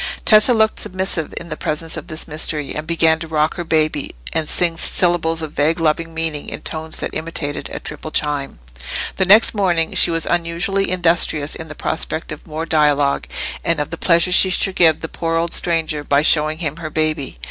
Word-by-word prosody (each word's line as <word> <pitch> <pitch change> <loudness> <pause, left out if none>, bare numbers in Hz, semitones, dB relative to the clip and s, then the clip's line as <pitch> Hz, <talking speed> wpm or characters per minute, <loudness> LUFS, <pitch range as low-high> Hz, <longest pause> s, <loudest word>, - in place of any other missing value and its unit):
Tessa 215 +3 +6
looked 220 -2 +2
submissive 185 -3 -2
in 170 - -7
the 155 - -4
presence 155 +2 -3
of - - -7
this 155 -2 -6
mystery, 150 -1 -2
and 150 +1 -5
began 160 -1 +2
to 165 - -6
rock 155 0 0
her 175 - -5
baby, 155 - 0 0.2
and 160 -2 +1
sing 170 -2 +4
syllables 165 -1 +2
of 155 - -5
vague 155 +3 0
loving 165 +1 0
meaning, 160 -2 -3
in - - -7
tones 160 0 -3
that - - -4
imitated 155 -2 -4
a - - -5
triple 150 +1 -7
chime. 145 -2 -2 0.6
The 190 - +2
next 210 +4 +6
morning 175 -6 0
she - - +5
was 165 -1 0
unusually 175 +3 -1
industrious 165 -4 +1
in 160 - -7
the 150 - -9
prospect 160 +1 -3
of 155 - -9
more 160 +1 -4
dialogue, 145 -3 +1 0.4
and 170 -2 +1
of 150 - -3
the - - -3
pleasure 170 +1 +3
she 190 +1 +5
should 185 +1 0
give 165 -4 +4
the 160 - -4
poor 165 0 -3
old 170 0 -1
stranger 160 -3 0
by 145 0 +2
showing 155 0 +2
him 155 -2 -4
her 165 -2 -6
baby. 155 - -2
160 Hz, 200 wpm, -18 LUFS, 155-170 Hz, 0.6 s, Tessa